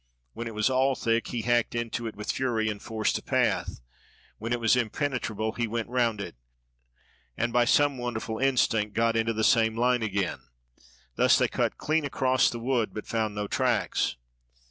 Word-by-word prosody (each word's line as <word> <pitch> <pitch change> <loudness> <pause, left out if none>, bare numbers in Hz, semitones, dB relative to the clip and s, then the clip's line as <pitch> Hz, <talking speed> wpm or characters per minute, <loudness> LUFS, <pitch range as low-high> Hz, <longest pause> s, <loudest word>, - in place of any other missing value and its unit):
When 115 - -5
it 115 - -7
was 105 0 +2
all 130 +1 +2
thick, 115 -1 0
he 120 -3 -3
hacked 120 0 +1
into 120 0 -3
it 110 - -6
with 105 +1 -3
fury 115 -4 0
and 105 -1 -5
forced 110 -2 -1
a - - -15
path. - - 0 0.6
When 115 +2 -5
it 120 - +1
was 115 +1 +4
impenetrable 120 -3 -1
he 120 +1 -2
went 115 +1 -3
round 120 -4 +1
it, 90 -7 -6 1.0
and 120 0 -1
by 120 -1 +4
some 145 +1 +3
wonderful 110 -2 -4
instinct 115 -6 +1
got 115 0 +2
into 115 0 +1
the 110 0 -1
same 110 -2 +3
line 125 0 +2
again. 100 -4 -1 0.8
Thus - - +5
they - - +3
cut - - -1
clean 155 +1 0
across 130 -2 +2
the 120 - -5
wood 120 -1 -1
but 110 - -5
found 110 -2 -2
no 105 0 -2
tracks. 100 - 0
115 Hz, 185 wpm, -27 LUFS, 110-125 Hz, 1.0 s, Thus